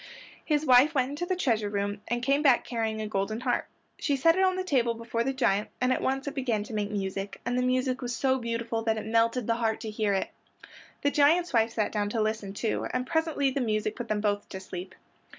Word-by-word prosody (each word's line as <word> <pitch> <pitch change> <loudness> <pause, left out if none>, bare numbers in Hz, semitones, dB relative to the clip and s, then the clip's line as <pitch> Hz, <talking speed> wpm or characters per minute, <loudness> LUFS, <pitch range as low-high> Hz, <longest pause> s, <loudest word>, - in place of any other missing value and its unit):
His 300 -1 0
wife 260 +4 +6
went 260 0 +1
into 310 +5 -4
the 370 - 0
treasure 225 - 0
room 205 0 -2
and 240 0 -2
came 275 +3 +2
back 270 -5 +4
carrying 225 -2 -2
a 215 - -3
golden 210 +2 -2
harp. 250 -1 0 0.3
She 285 - +1
set 330 +5 +4
it 380 - +2
on 370 -1 +3
the 370 - -2
table 245 -9 +1
before 230 0 -2
the 270 - 0
giant 210 -6 +1
and 255 0 +2
at - - -2
once 270 +1 -1
it 285 - -3
began 245 -7 -1
to 220 - -10
make 210 -1 -1
music, 195 -1 -4
and 245 - -1
the 250 - +2
music 255 +1 0
was 245 -1 -3
so 265 +1 +1
beautiful 230 -1 -2
that 225 -1 0
it 215 - -4
melted 230 +2 +2
the 230 +1 +1
heart 225 -2 0
to 220 - -5
hear 210 -1 0
it. 190 - -2 0.7
The 285 - +3
giant's 320 +4 +3
wife 225 -1 +3
sat 215 -3 0
down 205 -1 -1
to 225 - -2
listen, 215 -2 -2
too, 220 +1 -1
and 250 0 -1
presently 320 -3 +1
the 275 - -1
music 215 -2 -1
put 240 -2 -6
them 215 -1 -1
both 205 -1 -1
to 190 - -6
sleep. 185 0 -8
235 Hz, 240 wpm, -28 LUFS, 215-270 Hz, 0.7 s, wife